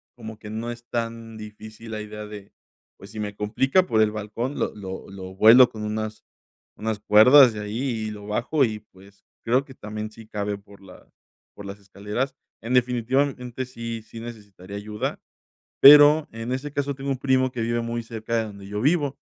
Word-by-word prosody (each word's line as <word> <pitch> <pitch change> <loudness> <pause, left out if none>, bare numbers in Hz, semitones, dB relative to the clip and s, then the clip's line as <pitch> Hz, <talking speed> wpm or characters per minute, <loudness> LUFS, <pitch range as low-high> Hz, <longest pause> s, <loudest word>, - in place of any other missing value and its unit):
como 110 -2 -9
que 105 - -10
no 115 +2 -4
es 120 0 -10
tan 115 -1 -4
difícil 110 +1 -11
la 110 -1 -4
idea 105 0 -8
de, 105 -1 -10 0.5
pues, 100 - -13
si 110 - -8
me 105 -1 -4
complica 130 - +1
por 110 -11 +2
el 110 -1 +3
balcón, 110 +6 -4
lo - - -2
lo 95 -2 -8
lo 95 -1 -9
vuelo 115 +5 +8
con 110 -1 -8
unas 110 0 -4 0.5
unas 110 -1 -3
cuerdas 120 +5 +7
de 105 - -6
ahí 105 +1 -5 0.3
y - - -4
lo 105 -1 -9
bajo 120 +8 +1
y, 110 -2 -4
pues, 100 -1 -21 0.2
creo 125 +4 +1
que 135 - -13
también 105 -1 -6
sí 110 0 -14
cabe 105 -1 -3
por 100 0 -18
la 95 -1 -15 0.5
por 100 - -10
las 100 +1 -8
escaleras. 105 +7 -4 0.3
En 115 +3 -4
definitivamente, 125 +1 0
sí, 115 -2 -6
sí 115 - -11
necesitaría 100 -4 -9
ayuda, 105 +1 -4 0.6
pero, 145 +2 +8
en 115 +2 -5
ese 135 +3 -4
caso, 145 -1 -2
tengo 135 +1 -5
un 135 - -1
primo 130 -1 +2
que 120 -3 -3
vive 120 +1 0
muy 115 0 -3
cerca 115 0 -4
de 115 - +1
donde 100 -2 -10
yo 105 0 -4
vivo, 145 -1 +1
110 Hz, 195 wpm, -24 LUFS, 105-125 Hz, 0.6 s, vuelo